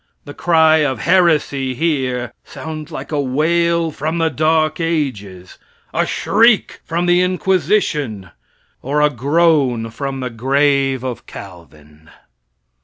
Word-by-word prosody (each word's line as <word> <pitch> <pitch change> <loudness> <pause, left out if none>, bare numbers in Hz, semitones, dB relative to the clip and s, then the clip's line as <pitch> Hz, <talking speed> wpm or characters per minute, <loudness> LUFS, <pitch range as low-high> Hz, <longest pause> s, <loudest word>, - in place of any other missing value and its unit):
The 145 - -9
cry 160 -1 +3
of 145 -4 0
"heresy" 150 -7 +2
here, 130 -5 -1
sounds 155 -1 -8
like 135 +3 -7
a 150 -2 0
wail 165 +4 +1
from 155 +3 -3
the 165 -1 +1
Dark 155 +2 +1
Ages 115 - -3 0.3
a - - 0
shriek 225 +1 +2
from 170 +1 -2
the 175 0 +3
Inquisition, 175 - 0 0.5
or 145 +3 -1
a 150 0 +3
groan 140 -4 +1
from 135 +2 -5
the 125 -1 -4
grave 135 +2 +1
of 125 -2 -6
Calvin. 80 -5 -13
145 Hz, 120 wpm, -18 LUFS, 125-165 Hz, 0.5 s, cry